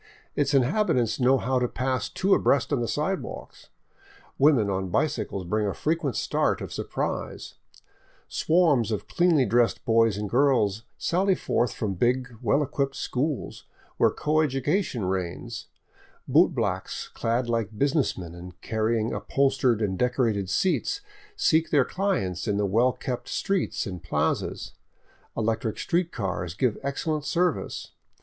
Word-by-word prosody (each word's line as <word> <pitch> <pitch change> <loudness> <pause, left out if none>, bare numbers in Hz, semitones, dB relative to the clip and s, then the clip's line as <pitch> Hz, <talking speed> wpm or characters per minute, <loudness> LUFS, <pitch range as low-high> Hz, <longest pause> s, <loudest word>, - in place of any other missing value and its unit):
Its 145 -1 +1
inhabitants 130 - +2
know 130 +1 +4
how 130 +1 0
to 125 - +1
pass 130 +1 -2
two 195 +1 +1
abreast 140 +1 +2
on 140 - +2
the 115 - -1
sidewalks; 155 +10 -4 0.7
women 135 -7 +5
on 95 -1 -2
bicycles 95 +2 -1
bring 105 +3 0
a 100 - -2
frequent 155 -4 -1
start - - 0
of - - -6
surprise; - - -4 0.7
swarms 155 - +2
of 105 - -3
cleanly 170 -6 +3
dressed 120 +2 +1
boys 115 -2 +3
and 105 0 -3
girls 115 -4 +2
sally 190 +2 +1
forth 120 - 0
from 105 -3 -2
big, 125 +5 0
well 130 +6 +2
equipped 140 -1 -2
schools, 140 +2 -3 0.3
where - - +5
coeducation 150 - 0
reigns; 90 -2 -4 0.6
bootblacks - - +1
clad 120 +2 -1
like 115 -2 -2
business 140 +2 +1
men 85 -3 -7
and 90 +1 -11
carrying 110 +1 0
upholstered 135 -5 +1
and 95 -3 -1
decorated 115 -6 +1
seats 190 - 0 0.3
seek 165 - +2
their 140 -5 +4
clients 125 - -1
in 105 -1 +1
the 105 - +1
well 115 +6 +3
kept 125 -1 -5
streets 195 -3 -1
and 90 -5 -6
plazas; 85 - -2 0.6
electric 115 0 -1
street 175 0 0
cars 90 -4 -3
give 120 -1 0
excellent 150 +2 -2
service. 175 +1 -1
125 Hz, 135 wpm, -26 LUFS, 105-150 Hz, 0.7 s, women